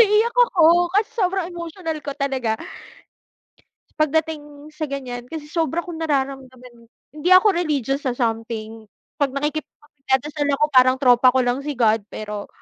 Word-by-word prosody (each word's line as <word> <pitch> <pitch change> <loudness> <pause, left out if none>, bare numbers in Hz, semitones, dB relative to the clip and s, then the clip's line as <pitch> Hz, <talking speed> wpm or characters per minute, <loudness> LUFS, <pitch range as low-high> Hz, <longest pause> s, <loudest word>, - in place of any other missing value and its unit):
naiiyak 440 +2 +4
ako 350 -8 +5
kasi 415 +2 +2
sobrang 370 -3 0
emotional 335 -2 -5
ko 280 -1 -4
talaga 265 -5 -1 1.5
pagdating 305 -1 -2
sa 305 0 -4
ganyan. 250 -3 -6
Kasi 310 -1 -7
sobra 330 0 -1
kong 330 -2 -8
nararamdaman 265 -5 -4 0.2
hindi 305 +4 -3
ako 405 +3 +6
religious 285 -5 -1
sa 245 - -1
something 225 -2 -4 0.3
'pag 280 -2 0
nakikip 295 +2 -2 0.2
pag 295 - -23
nagdadasal 285 +2 -1
ako 300 +2 +2
parang 255 -1 +5
tropa 250 -1 +5
ko - - +4
lang 245 +2 0
si 290 0 -5
God, 225 -2 +2
pero 210 -1 -6
285 Hz, 145 wpm, -21 LUFS, 250-320 Hz, 1.5 s, ako